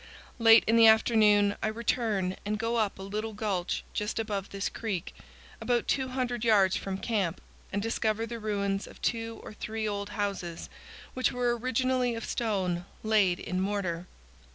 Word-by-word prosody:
Late 225 0 +8
in 225 +1 +3
the 225 -1 +8
afternoon 215 -2 +5
I - - 0
return 215 -4 0
and 210 +1 -1
go 230 +2 -1
up 215 -3 0
a 190 - -8
little 215 +3 -4
gulch 200 -4 -2
just 210 0 -2
above 205 -3 -2
this 200 0 -3
creek, 200 -7 -4 0.5
about 240 -1 0
200 255 -3 -1
yards 200 -5 +4
from 195 -1 -3
camp, 195 -5 -1 0.3
and 200 0 -1
discover 225 -1 0
the 230 0 -6
ruins 200 -2 -1
of - - -14
two 230 -1 -2
or - - -9
three 220 +1 -4
old 200 -1 -3
houses, 195 -5 -3 0.4
which 255 - +1
were 245 -1 +1
originally 255 0 0
of 230 - -5
stone 185 -6 -1 0.2
laid 205 -5 +3
in 185 0 -2
mortar. 185 -3 -2
215 Hz, 160 wpm, -29 LUFS, 195-230 Hz, 0.5 s, Late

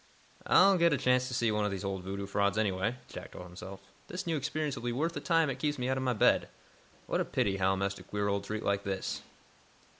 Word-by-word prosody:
"I'll 195 -2 +6
get 170 -2 +5
a - - +2
chance 125 0 +2
to 130 - -5
see 120 -3 +2
one 105 0 +1
of 105 - +1
these 100 0 -4
old 95 -1 -2
voodoo 100 +2 -4
frauds, 100 0 +1
anyway," 105 +2 +1
Jack - - -9
told 90 - -8
himself. 95 +2 -9 0.3
"This 180 +1 -5
new 165 -2 0
experience 150 0 -2
will 120 - -7
be 120 0 -1
worth 155 +8 0
the 145 - -3
time 165 +2 +3
it 135 -1 -3
keeps 150 +1 0
me 125 0 -1
out 130 - +1
of - - -1
my 130 -1 +1
bed. 105 - +3 0.6
What - - 0
a - - +2
pity 95 -1 0
Hal 95 0 +2
missed 100 0 -2
a - - -11
queer 105 0 -2
old 100 0 0
treat 110 +2 -4
like 100 0 +1
this!" 95 -1 -3
110 Hz, 250 wpm, -31 LUFS, 100-135 Hz, 0.6 s, I'll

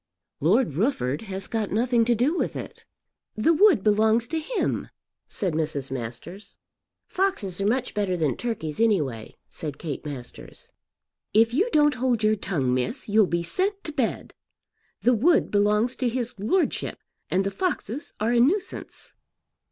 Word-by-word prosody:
"Lord 195 - +3
Rufford 165 - 0
has 190 0 -4
got 220 -3 -2
nothing 235 +2 +2
to 240 0 +3
do 260 +9 +1
with - - -1
it." - - -8 0.5
"The 230 +10 +3
wood 345 - +5
belongs 220 +2 +3
to 325 - -1
him," 405 +9 -2 0.4
said 185 -6 -2
Mrs. 150 -4 -2
Masters. 130 - -7 0.5
"Foxes 210 - -1
are 200 - +1
much 250 +3 0
better 200 -3 0
than 155 -5 0
turkeys 220 -10 -4
anyway," 150 - 0
said 150 -3 -6
Kate 150 -3 -5
Masters. 135 -5 -9 0.6
"If 225 +2 +5
you 385 - +2
don't 295 -6 +4
hold 245 -4 +1
your 215 0 +4
tongue, 155 -11 -1
miss, 130 - -2
you'll 210 -1 +4
be 170 0 -1
sent 390 - -1
to 310 - -5
bed. 260 -6 -2 0.7
The 250 - +5
wood 315 +10 +3
belongs 210 +4 +2
to 250 - +1
his 245 0 -3
lordship, 340 - 0 0.3
and 190 - +2
the 195 - -2
foxes 300 - -3
are 220 +3 +1
a 240 - +4
nuisance." 345 - -1
215 Hz, 155 wpm, -25 LUFS, 175-255 Hz, 0.7 s, wood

